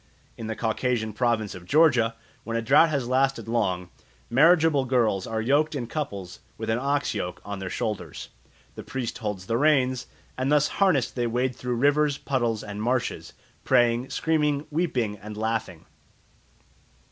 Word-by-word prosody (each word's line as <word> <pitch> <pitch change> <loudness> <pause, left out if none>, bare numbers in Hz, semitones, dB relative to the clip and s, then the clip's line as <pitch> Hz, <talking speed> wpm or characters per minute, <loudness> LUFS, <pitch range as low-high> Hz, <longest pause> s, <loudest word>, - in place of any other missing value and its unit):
In 115 - -7
the 110 - -3
Caucasian 110 -1 -1
province 115 -2 0
of 90 -1 -11
Georgia, 125 - +4 0.3
when 115 0 -3
a - - 0
drought 145 +8 +5
has 140 -5 -1
lasted 135 0 +1
long, 95 -6 -1 0.4
marriageable 155 0 +5
girls 115 -7 +1
are 110 0 -2
yoked 145 +5 +2
in 130 -4 -2
couples 100 - -5 0.2
with - - -2
an 115 - +1
ox 140 +2 0
yoke 90 0 -4
on 100 -1 -5
their 95 -1 -5
shoulders, 95 -9 -4 0.5
a - - -7
priest 130 -3 -5
holds 105 -5 -4
the 115 +3 0
reins, 130 -4 +2 0.3
and 130 +2 0
thus 150 0 +4
harnessed 185 - +2
they 120 -2 0
wade 125 +2 -1
through 125 -1 -3
rivers, 145 +3 +2
puddles, 120 -7 -1
and 105 0 -6
marshes, 125 +2 -2 0.3
praying, 120 0 +2
screaming, 150 -2 0
weeping, 125 - -1
and 105 +1 -9
laughing. 110 -6 -3
120 Hz, 160 wpm, -26 LUFS, 110-140 Hz, 0.5 s, drought